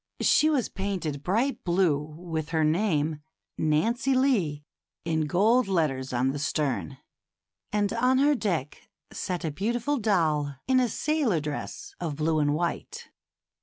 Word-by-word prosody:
She 310 - +4
was 280 -6 +1
painted 185 -8 -3
bright 225 - 0
blue, 170 -5 +2 0.2
with 165 -3 -4
her 160 -1 +1
name, 155 -3 +1 0.3
Nancy 230 - +1
Lee," 190 - +1 0.4
in 160 -2 0
gold 220 - +3
letters 150 -8 0
on 125 +2 +1
the 145 - -4
stern, 140 - -1 0.7
and 205 -1 0
on 250 +3 +2
her 285 +2 +4
deck 175 - -3 0.2
sat 180 -2 -3
a 160 - -1
beautiful 235 - -1
doll 155 -9 +1
in 260 -1 +4
a 250 -2 +2
sailor 285 - 0
dress 150 -1 -6
of 160 -4 -3
blue 155 +1 +1
and 145 0 +2
white. 170 +2 -4
170 Hz, 140 wpm, -27 LUFS, 150-230 Hz, 0.7 s, She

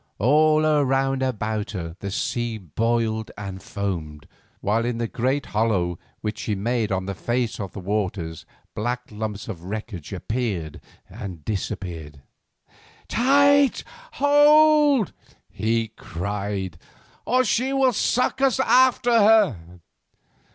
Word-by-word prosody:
All 155 +7 +4 0.2
round 135 0 +1
about 110 -4 -2
her 85 -4 -5
the 100 - -5
sea 115 +3 -2
boiled 110 +4 -1
and 95 -2 -6
foamed, 80 -7 -5 0.3
while 110 +3 0
in 120 0 -2
the 115 0 -1
great 130 +5 -1
hollow 100 -6 0 0.2
which 105 +1 -4
she 105 - -2
made 115 +1 -1
on 95 -1 -1
the 100 - -3
face 120 +3 -2
of 100 -3 -5
the - - -7
waters 95 -4 -3 0.3
black 120 +3 -2
lumps 105 -1 -5
of 90 -7 -7
wreckage 100 -5 -6
appeared 100 -6 -3 0.3
and 90 -7 -9
disappeared. 90 -8 -5 0.9
"Tight! 280 +2 +4 0.3
hold 290 - +5
tight!" - - -29
he 115 +1 0
cried, 100 -2 -5 0.4
"or 255 +1 +2
she 250 +4 +1
will 270 -2 +3
suck 250 +5 +1
us 270 -1 +3
after 255 -2 +4
her." 210 - +5
110 Hz, 125 wpm, -23 LUFS, 95-155 Hz, 0.9 s, hold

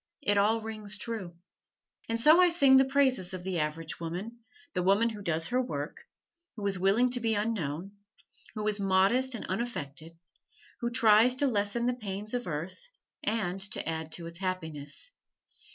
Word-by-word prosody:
It 205 - +2
all 215 +3 +3
rings 215 -2 -4
true. 205 -7 -5 0.7
And 230 0 0
so 310 +8 +7
I 360 - +6
sing 280 -6 +6
the 265 - +6
praises 260 -9 +2
of 180 - -7
the 185 -2 -2
average 155 +1 -3
woman 180 +8 -5 0.3
the 180 - 0
woman 200 +5 +3
who 215 -2 -7
does 165 -3 -1
her 250 +1 +2
work, 145 - -4 0.6
who 210 -3 -5
is 195 -2 0
willing 210 +7 +3
to 245 - 0
be 225 -2 0
unknown, 195 -5 -2 0.6
who 215 0 -2
is 210 -1 +1
modest 200 +7 +3
and 230 - -6
unaffected, 165 - -5 0.6
who 235 - -1
tries 230 +1 +5
to 285 - +1
lessen 220 -1 0
the 250 - +2
pains 210 -2 -5
of 245 -3 -2
earth, 170 - -5 0.3
and 195 -4 -1
to - - -3
add 160 -1 -3
to 170 - -6
its 170 +1 -8
happiness. 160 - -4
205 Hz, 170 wpm, -30 LUFS, 175-235 Hz, 0.7 s, so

